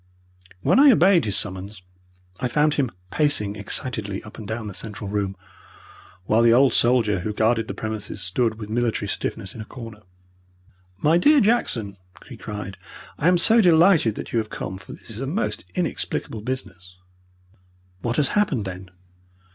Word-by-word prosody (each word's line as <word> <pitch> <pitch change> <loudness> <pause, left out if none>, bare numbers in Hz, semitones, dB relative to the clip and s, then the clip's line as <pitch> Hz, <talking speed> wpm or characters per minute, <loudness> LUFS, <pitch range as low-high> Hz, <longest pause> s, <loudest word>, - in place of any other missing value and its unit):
When 165 - +3
I 290 +1 +8
obeyed 190 - +4
his 105 - +1
summons 95 0 -6 0.6
I 125 - 0
found 150 +4 +2
him 140 -5 0 0.2
pacing 125 -10 +2
excitedly 105 -1 -2
up 110 +1 -12
and 105 - -8
down 110 +1 -4
the 105 - -6
central 105 0 -7
room, 100 -2 -2 0.9
while 110 +4 +3
the 115 0 +5
old 130 +2 +5
soldier 115 -5 +3
who 105 +4 -3
guarded 110 0 +1
the - - -5
premises 110 -2 -5
stood 110 +5 0
with 105 -1 -8
military 115 +1 -1
stiffness 95 - -4
in 115 - -8
a - - -7
corner. 115 -3 -10 1.0
"My 160 +9 +3
dear 295 +9 +5
Jackson," 120 - 0 0.3
he - - -9
cried, 105 -2 -7 0.4
"I 155 - +2
am 180 0 +5
so 225 +6 +5
delighted 165 - +5
that - - -7
you 115 - +2
have 110 -1 -4
come, 95 +1 -6
for 95 - -13
this - - -12
is 110 +3 -7
a 135 - -3
most 180 +10 -2
inexplicable 165 - -2
business." 90 -8 -6 1.0
"What 120 0 -2
has 145 - +2
happened, 155 - 0
then?" 95 0 -7
115 Hz, 170 wpm, -23 LUFS, 105-145 Hz, 1.0 s, I